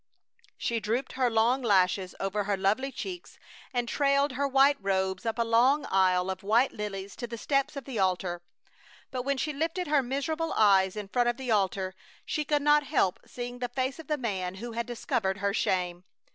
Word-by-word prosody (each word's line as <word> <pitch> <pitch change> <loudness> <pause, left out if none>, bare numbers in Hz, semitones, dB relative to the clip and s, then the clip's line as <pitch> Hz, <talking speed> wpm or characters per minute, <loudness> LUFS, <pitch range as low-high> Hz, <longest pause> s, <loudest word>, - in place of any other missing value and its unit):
She 235 -1 -1
drooped 230 +5 -2
her 255 -2 +1
long 235 +4 +2
lashes 190 -4 +2
over 195 +1 -1
her 200 -1 0
lovely 215 +8 +1
cheeks, 360 +4 -7 0.3
and 245 -2 -1
trailed 280 +2 +2
her 280 +2 0
white 275 +1 +4
robes 190 +1 -1
up 225 - -1
a 235 - +2
long 245 +6 +3
aisle 185 -1 +3
of 190 0 -6
white 230 +6 +3
lilies 200 -2 -6
to 240 - -4
the 235 0 -6
steps 275 +4 0
of 275 -3 -6
the 255 -6 -4
altar; 180 -2 0 0.7
but 255 -1 -2
when 275 +2 -1
she 300 +3 -1
lifted 330 +5 -2
her 295 -2 +3
miserable 310 +6 -2
eyes 195 -3 +4
in 210 -2 -5
front 240 +3 +2
of 240 - -2
the 260 -3 -3
altar 190 -2 +1 0.3
she 300 - -1
could 295 -1 0
not 295 0 +5
help 265 -11 +1
seeing 245 0 -6
the 245 -1 -2
face 260 +3 -2
of 320 - -10
the 300 - 0
man 190 -7 -3
who 235 +5 -6
had 235 +1 -3
discovered 230 -5 -1
her 200 0 -1
shame. 180 -2 -1
235 Hz, 200 wpm, -28 LUFS, 195-275 Hz, 0.7 s, not